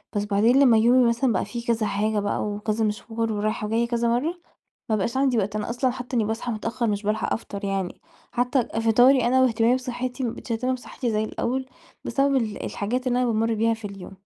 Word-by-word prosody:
بس 205 0 0
بعدين 215 +6 +3
لما 250 -5 +6
يومي 245 +3 +5
مثلًا 235 +1 +1
بقى 185 - 0
فيه 235 +4 -6
كذا 230 -2 +1
حاجة 210 +1 0
بقى 205 0 -1
وكذا 210 +1 -1
مشوار 225 +2 -2
ورايحة 210 0 -2
وجايّة 230 +2 +1
كذا 235 0 0
مرّة، 250 +8 +1 0.6
ما 220 - +2
بقاش 215 +5 -2
عندي 265 -3 +2
وقت. 205 0 -1
أنا 210 +1 -3
أصلًا 250 +2 +1
حتى 250 0 -5
إني 225 - +2
باصحى 225 +3 -3
متأخّر 230 +3 -2
مش 205 -2 -1
بالحَق 210 +1 -1
أفطَر 200 -2 -5
يعني، 195 -2 -3 0.3
حتى 250 +1 +1 0.2
فطاري 245 +3 +5
أنا 260 +2 +3
وإهتمامي 230 -1 +3
بصحّتي 255 0 -3
ما 235 - 0
بقيتش 235 - -7
باهتم 250 +3 0
بصحّتي 245 -1 -4
زي 215 0 0
الأول، 260 +4 -2 0.4
بسبب 275 0 +1
ال 225 -5 -2
الحاجات 245 +6 -3
اللي 250 0 +2
أنا 250 - +2
بامُر 225 0 +1
بيها 225 +1 +2
في 225 -1 -14
اليوم. 195 -2 -9
230 Hz, 210 wpm, -24 LUFS, 215-250 Hz, 0.6 s, لما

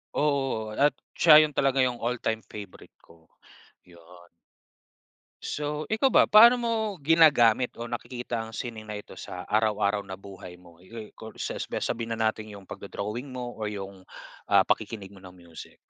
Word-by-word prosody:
Oo, 135 -7 0
at 140 +4 +2 0.2
siya 155 -2 +7
'yon 150 - -2
talaga. 135 -2 +2
'Yong 125 -2 -1
all-time 115 -2 -2
favorite 100 -3 -11
ko, 85 -1 -22 0.6
'yon. 85 0 -18 1.2
So 150 +1 -3
ikaw 220 +5 +3
ba, - - +5
paano 235 +4 +9
mo 235 -1 -2 0.3
ginagamit 140 -7 +4
o 115 - -7
nakikita 120 0 -5
ang 110 0 -7
sining 110 -3 -6
na 105 - -5
ito 105 - -10
sa 90 0 -7
araw-araw 105 -1 +1
na 95 - -6
buhay 95 -2 -11
mo? 85 -2 -19
Yu 110 +4 -11
ku 110 - -12
sasbi - - -5
sabihin 115 -1 -3
na 110 -1 +1
natin 110 -1 -11
'yong 100 - -12
pagdo-drawing 105 +7 -6
mo 125 -2 -6
o 110 - -2
'yong, 100 -2 -8 0.4
ah, - - +5
pakikinig 100 -4 -2
mo 100 - -15
ng 95 -1 -14
music. 85 -2 -13
110 Hz, 160 wpm, -26 LUFS, 100-130 Hz, 1.2 s, paano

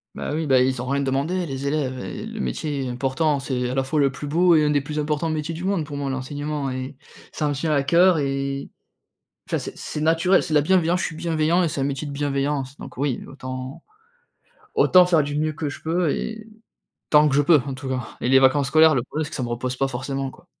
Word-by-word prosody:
Bah, - - -4
oui, 155 0 -2
bah, 130 -2 +5
ils 130 -1 +1
ont - - -5
rien 140 +1 0
demandé, 140 +7 -1
les 135 -2 -4
élèves, 140 -3 -1
heu - - -6
et 90 - -6
le - - -7
métier 135 - -2
est - - -3
important, 135 +4 0
c'est 125 -2 -2
à 125 - -3
la 135 - +1
fois 150 +4 -1
le 140 -2 +3
plus 135 +2 -7
beau 170 +3 +4
et 155 - +4
un 150 - +2
des 145 -1 +2
plus 150 +2 -6
importants 150 +2 -1
métiers 155 +1 -2
du 165 +2 -6
monde 190 -4 0
pour 145 -1 -8
moi, 140 -1 -2
l'enseignement 145 +2 -3
et 130 +1 -6 0.3
ça 150 - -1
me 145 - 0
tient 155 +3 -2
à 140 -2 +2
cœur 170 +5 +5
et 140 -1 -2 0.8
enfin, - - +1
c'est - - -6
c'est 150 - -5
naturel. 165 +4 +3
C'est 155 - -4
de 150 - +6
la - - +2
bienveillance, 175 +1 +2
je - - -1
suis 165 - -5
bienveillant 165 +1 +1
et 170 - +1
c'est 140 - -3
un - - +1
métier 140 +1 -3
de - - -6
bienveillance, 140 -1 -2
donc - - -11
oui, 135 -2 -1
autant 130 +1 -7 0.9
autant 185 - +6
faire 170 -4 +3
du 145 0 -3
mieux 155 +1 0
que 150 0 -4
je 145 - -8
peux 165 0 0
et 220 +7 -4 0.6
tant 150 0 +6
que 135 - 0
je 145 - +5
peux, 150 0 +5
en 135 - -3
tout 130 +1 -7
cas 130 -2 -4
et - - -2
les 130 +1 +6
vacances 135 +1 +4
scolaires, 155 +2 +5
le 120 - 0
problème 150 +5 -3
c'est 150 - -6
que - - -7
ça 130 - -2
me 120 - -3
repose 125 +2 -3
pas 135 - +1
forcément, 135 +1 -3
quoi. - - -17
145 Hz, 260 wpm, -23 LUFS, 135-155 Hz, 0.9 s, de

